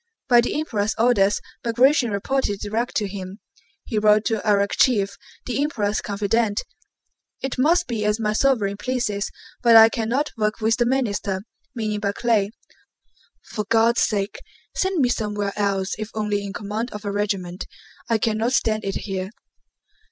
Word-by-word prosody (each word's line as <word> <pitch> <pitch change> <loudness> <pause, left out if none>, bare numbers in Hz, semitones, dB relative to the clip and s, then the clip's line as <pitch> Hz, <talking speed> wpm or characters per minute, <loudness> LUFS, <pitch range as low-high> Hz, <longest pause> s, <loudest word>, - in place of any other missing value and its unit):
By 240 -2 +6
the 245 - -1
Emperor's 220 -8 -1
orders 210 -4 +3 0.2
Bagratión 245 +1 +3
reported 205 0 -1
direct 220 +4 -2
to 210 - +1
him. 190 0 -7 0.5
He 220 - -1
wrote 210 0 +4
to 220 -1 0
Arakchéev, 200 0 +2 0.3
the 250 +1 -1
Emperor's 215 -8 0
confidant: 205 +1 0 0.8
"It 270 -1 -3
must 340 +6 +3
be 225 -3 -3
as 210 +1 +1
my 210 -1 0
sovereign 215 -5 +1
pleases, 215 -3 -2 0.3
but 235 -2 +6
I 225 0 +10
cannot 245 +6 -1
work 215 -1 -1
with 220 0 +2
the 240 -1 +2
Minister 205 -7 -1 0.3
(meaning 215 -2 -2
Barclay). 205 0 +1 1.0
For 210 -2 -3
God's 230 +1 +4
sake 205 -1 0 0.4
send 380 -4 +1
me 250 - +3
somewhere 210 -4 -2
else 195 -2 0
if 215 0 -4
only 210 -1 -1
in 200 - -5
command 215 +3 -4
of 210 0 -8
a 200 - -1
regiment. 195 -3 -2 0.4
I 230 - +3
cannot 225 +3 0
stand 215 -3 +1
it 195 -1 -3
here. 190 -1 -3
215 Hz, 150 wpm, -23 LUFS, 205-235 Hz, 1.0 s, I